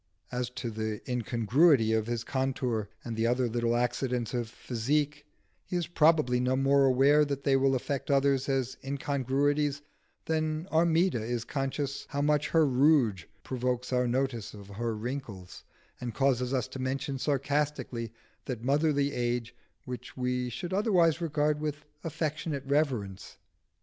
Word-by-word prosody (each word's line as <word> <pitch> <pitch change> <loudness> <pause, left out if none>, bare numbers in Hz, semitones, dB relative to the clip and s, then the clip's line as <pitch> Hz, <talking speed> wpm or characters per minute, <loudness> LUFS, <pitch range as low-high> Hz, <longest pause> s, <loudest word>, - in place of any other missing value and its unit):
As 125 0 -2
to 120 - -3
the 110 -1 -3
incongruity 120 +1 +3
of 110 0 +1
his 120 -1 -2
contour 130 -5 -1 0.2
and 115 -2 -2
other 125 +2 +2
little 120 0 0
accidents 125 0 -1
of 120 -2 -2
physique, 145 +6 -2 0.4
he - - -5
is 175 -1 0
probably 155 -7 +3
no 125 +1 +1
more 135 +1 +4
aware 135 +3 +5
that 140 -1 -3
they 135 -1 +3
will 135 0 +3
affect 135 +2 -3
others 140 -1 +2
as 130 -1 -1
incongruities 140 +1 0 0.4
than 155 0 -1
Armida 165 -4 +3
is 120 0 -2
conscious 140 0 -3
how 145 -1 -2
much 150 0 +2
her 160 -1 +4
rouge 130 - +3 0.2
provokes 125 0 -2
our 125 0 +2
notice 120 -4 -1
of 100 -1 -12
her 115 +3 -3
wrinkles, 110 -5 -6 0.3
and 120 -3 -5
causes 130 -2 +1
us 130 -1 0
to 130 - -8
mention 135 +1 -2
sarcastically 140 -4 -1 0.3
that 120 -4 -5
motherly 145 +1 +2
age 120 -1 -2 0.3
which 125 0 -7
we 125 0 -1
should 170 +10 -5
otherwise 180 -6 +3
regard 150 -2 +1
with 150 0 -4 0.2
affectionate 155 -3 -3
reverence. 130 -10 -1
135 Hz, 145 wpm, -29 LUFS, 120-145 Hz, 0.4 s, aware